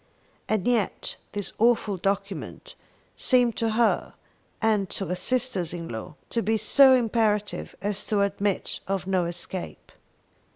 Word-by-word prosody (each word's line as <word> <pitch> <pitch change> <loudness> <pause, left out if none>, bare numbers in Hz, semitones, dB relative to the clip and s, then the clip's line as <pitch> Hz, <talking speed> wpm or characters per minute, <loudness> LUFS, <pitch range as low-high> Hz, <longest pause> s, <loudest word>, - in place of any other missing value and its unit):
And 215 -2 0
yet 235 -5 0 0.2
this 205 -2 -3
awful 225 -3 +3
document 195 +2 -3 0.4
seemed 245 -3 +3
to 225 -1 0
her 230 +1 +1 0.4
and 210 -4 +1
to 195 - -2
her 180 - -2
sisters 235 -4 0
in 170 -1 -6
law 110 +5 -7 0.2
to 230 - 0
be 220 +2 +1
so 265 +3 +6
imperative 220 -3 0
as 205 0 -1
to 210 -2 +1
admit 200 0 -1
of 195 -1 -2
no 185 -2 +1
escape. 175 +1 -5
205 Hz, 135 wpm, -26 LUFS, 190-230 Hz, 0.4 s, so